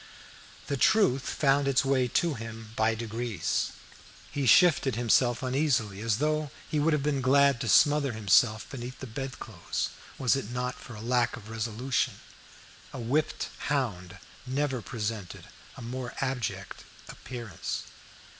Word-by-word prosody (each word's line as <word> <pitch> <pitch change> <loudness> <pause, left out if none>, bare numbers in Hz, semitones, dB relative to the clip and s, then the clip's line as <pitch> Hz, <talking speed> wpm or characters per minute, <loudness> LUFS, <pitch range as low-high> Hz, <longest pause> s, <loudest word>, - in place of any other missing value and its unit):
The 140 - -2
truth 140 - +3
found 140 -1 +2
its 135 -1 +3
way 135 -2 +2
to 165 +6 +1
him 115 -2 -8
by 110 0 +2
degrees. 115 -4 -2 0.6
He 140 -2 -1
shifted 150 - +5
himself 120 +1 +2
uneasily, 125 -7 0
as 110 -2 +1
though 155 +1 0 0.2
he 155 - -1
would 155 +2 +3
have 150 -2 +1
been 145 -2 0
glad 140 0 +4
to 120 - -2
smother 145 -3 +4
himself 110 +1 +3
beneath 125 -1 -7
the - - -6
bedclothes, 120 -6 -4 0.3
was 130 0 +3
it 135 -6 -4
not 125 +1 -2
for 115 -3 -11
lack 120 +1 +1
of 110 -2 -12
resolution. 115 +3 -1 0.8
A 135 - -7
whipped 140 +7 -1 0.2
hound 100 -11 -2 0.3
never 135 -1 -1
presented 105 -2 -5 0.3
a - - -8
more 125 +1 -5
abject 115 -8 -3 0.2
appearance. 120 -8 -6
125 Hz, 135 wpm, -28 LUFS, 115-140 Hz, 0.8 s, shifted